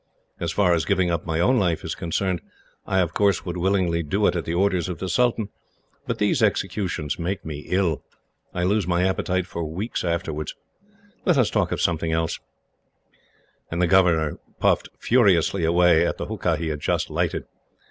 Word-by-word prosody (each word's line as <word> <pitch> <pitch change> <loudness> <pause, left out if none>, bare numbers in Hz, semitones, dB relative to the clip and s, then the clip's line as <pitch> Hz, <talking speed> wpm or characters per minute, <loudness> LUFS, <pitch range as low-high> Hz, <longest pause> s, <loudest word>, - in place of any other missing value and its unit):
As 85 -1 -2
far 90 -1 +3
as 80 -1 +1
giving 90 -1 +1
up 85 0 -2
my 80 0 -1
own 120 +9 +3
life 85 -5 0
is - - -3
concerned, 90 +1 -2 0.5
I 95 -1 +3
would 90 +1 0
willingly 90 -2 +1
do 95 +7 0
it - - +3
at 85 - -2
the 85 - -2
orders 95 -1 +1
of 90 - -4
the 95 - -4
sultan, 115 +2 +1 0.6
but - - -1
these - - +1
executions 85 -7 -1
make 95 +3 -3
me 75 -1 -6
ill. 90 -4 0 0.5
I 90 - -2
lose 100 +2 +1
my 90 +1 +2
appetite 95 -1 0
for 85 -2 -5
weeks 90 +9 -3
afterwards. 80 -3 -2 0.7
Let 175 -5 +3
us 125 -5 +3
talk - - +1
of - - -1
something 80 -1 0
else." 80 0 -1 1.3
And 85 - -3
the 90 - +4
governor 85 -4 +3 0.2
puffed - - +2
furiously 100 -6 +3
away 85 0 +4
at - - -2
the - - -4
hookah - - -1
he 80 0 -3
had 75 -1 -3
just - - -1
lighted. - - -1
90 Hz, 180 wpm, -24 LUFS, 85-95 Hz, 1.3 s, the